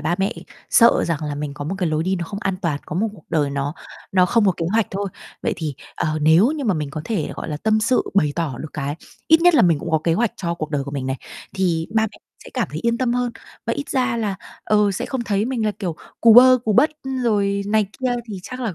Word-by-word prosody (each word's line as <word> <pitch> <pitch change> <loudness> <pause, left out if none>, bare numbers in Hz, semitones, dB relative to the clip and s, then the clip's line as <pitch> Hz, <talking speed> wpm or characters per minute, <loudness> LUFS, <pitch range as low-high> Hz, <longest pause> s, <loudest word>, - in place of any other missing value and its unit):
ba 175 - 0
mẹ 195 +1 +1 0.4
sợ 235 0 +5
rằng 160 -2 -2
là 150 - -3
mình 145 0 -4
có 145 - -6
một 180 +6 -3
cái 180 -3 0
lối 155 +1 0
đi 190 +2 0
nó 175 - -3
không 200 +4 -6
an 195 -1 -1
toàn, 150 -4 0
có 155 - -4
một 220 +4 +1
cuộc 185 - -16
đời 150 -4 +1
nó 140 +2 -2 0.4
nó 180 -1 +5
không 225 0 +3
có 190 - +4
kế 165 - -2
hoạch 225 -2 +2
thôi. 195 +1 -3 0.3
Vậy - - 0
thì, 155 -4 -4 0.2
ờ, 155 0 -1
nếu 165 - +5
như 300 -2 -3
mà 205 -6 +2
mình 150 -2 -3
có 155 - -5
thể, 200 -7 -2
gọi - - -5
là, 150 - -3
tâm 220 +5 +1
sự 240 +4 +2
bày 150 -7 +3
tỏ 165 -6 -1
được 155 - -6
cái 145 -1 -3 0.3
ít 320 +1 +6
nhất 355 0 +5
là - - +6
mình 165 -4 +4
cũng 165 - -5
có 160 - +3
kế 165 - +3
hoạch 230 +3 +1
cho 170 -2 -2
cuộc 155 -2 -5
đời 145 -3 -1
của 140 - -6
mình 135 -2 -4
này, 130 - -1 0.4
thì 175 -4 0
ba 220 - +4
mẹ - - -14 0.3
sẽ - - -11
cảm - - 0
thấy - - -4
yên 235 0 +1
tâm 250 -2 +1
hơn 245 -1 -1 0.3
và 230 - +1
ít 285 +3 -4
ra 255 -3 0
là, 215 -4 -1 0.3
ờ, 210 -1 +3
sẽ - - -3
không 260 -3 -3
thấy 205 +1 0
mình 240 -3 -1
là, - - +2
kiểu, 175 -6 -3 0.2
cù 230 -1 +7
bơ 255 +1 +9
cù 215 - +2
bất, 300 +9 +5 0.3
rồi 200 -3 +1
này 215 +1 +2 0.2
kia 255 -1 +1
thì 200 -3 -6
chắc 255 +6 -7
là 225 -7 -2
195 Hz, 280 wpm, -21 LUFS, 155-230 Hz, 0.4 s, bơ